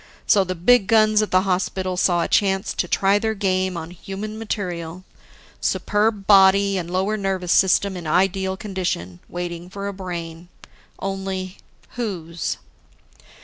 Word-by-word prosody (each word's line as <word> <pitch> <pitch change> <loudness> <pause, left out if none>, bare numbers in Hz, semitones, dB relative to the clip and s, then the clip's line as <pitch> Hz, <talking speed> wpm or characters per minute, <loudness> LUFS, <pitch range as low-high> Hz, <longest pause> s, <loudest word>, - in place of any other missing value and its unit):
So, 200 -3 +4
the 185 0 -4
big 200 +4 +4
guns 215 -1 +4
at 215 - -1
the 185 - +4
hospital 185 0 -1
saw 175 -1 +2
a - - -1
chance 195 -1 +1
to 180 - -1
try 195 +3 +2
their 220 0 -1
game 185 -2 0
on 165 +1 -6
human 200 +4 -7
material, 180 -5 -4 0.6
superb 210 -1 0
body 195 0 +5
and 175 -2 -3
lower 190 +4 0
nervous 190 -3 -2
system 190 +1 +3
in 175 -3 -6
ideal 190 +3 +1
condition, 180 - -4
waiting 175 0 -5
for 200 +1 -5
a 200 - -4
brain. 175 -3 -7 0.5
Only, 190 -1 -4 0.3
whose? 175 -9 -4
190 Hz, 145 wpm, -22 LUFS, 180-200 Hz, 0.6 s, body